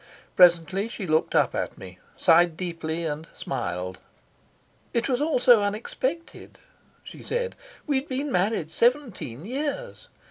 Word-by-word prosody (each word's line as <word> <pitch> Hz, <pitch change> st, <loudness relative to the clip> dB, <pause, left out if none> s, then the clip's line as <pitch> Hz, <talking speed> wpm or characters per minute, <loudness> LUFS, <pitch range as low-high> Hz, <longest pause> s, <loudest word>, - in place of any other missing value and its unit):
Presently 180 Hz, +3 st, +5 dB
she 225 Hz, -3 st, -6 dB
looked 155 Hz, -1 st, +1 dB
up -, -, +3 dB
at -, -, -3 dB
me, 90 Hz, -1 st, -11 dB, 0.2 s
sighed 170 Hz, -1 st, +4 dB
deeply, 165 Hz, -2 st, -3 dB
and 155 Hz, +1 st, -4 dB
smiled. 90 Hz, +1 st, -4 dB, 1.0 s
"It 235 Hz, -, +1 dB
was 255 Hz, 0 st, 0 dB
all 310 Hz, -1 st, +2 dB
so 245 Hz, -3 st, +6 dB
unexpected," 240 Hz, +10 st, -4 dB, 0.5 s
she -, -, -11 dB
said. 485 Hz, 0 st, -2 dB, 0.3 s
"We'd 280 Hz, -1 st, -1 dB
been 275 Hz, +2 st, -2 dB
married 180 Hz, -4 st, 0 dB
seventeen 230 Hz, -, 0 dB
years. 290 Hz, -, -4 dB
200 Hz, 130 wpm, -25 LUFS, 165-265 Hz, 1.0 s, so